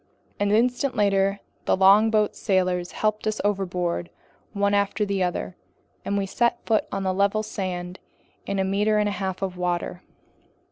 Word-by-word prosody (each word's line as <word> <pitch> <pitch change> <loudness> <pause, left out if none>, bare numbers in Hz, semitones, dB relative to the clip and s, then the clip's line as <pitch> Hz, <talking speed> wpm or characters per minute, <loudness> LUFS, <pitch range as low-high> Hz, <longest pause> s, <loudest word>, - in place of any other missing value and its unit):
An 205 0 +1
instant 245 +5 +2
later, 195 -1 +2 0.2
the - - +2
longboat's 210 +2 +4
sailors 185 -3 0
helped 215 0 -1
us 215 - -1
overboard 180 -4 -1 0.4
one 200 -1 +1
after 205 +1 +1
the 200 -1 -1
other, 180 0 -2 0.5
and 200 - -1
we 200 - 0
set 235 +4 +1
foot 220 -2 +1
on 195 - -2
level 200 +3 +1
sand 180 -3 -5 0.5
in 200 - -1
a 190 - +2
meter 205 +3 +1
and 210 0 +2
a - - 0
half 190 0 -3
of 185 -2 -3
water. 180 0 -2
200 Hz, 155 wpm, -24 LUFS, 185-210 Hz, 0.5 s, longboat's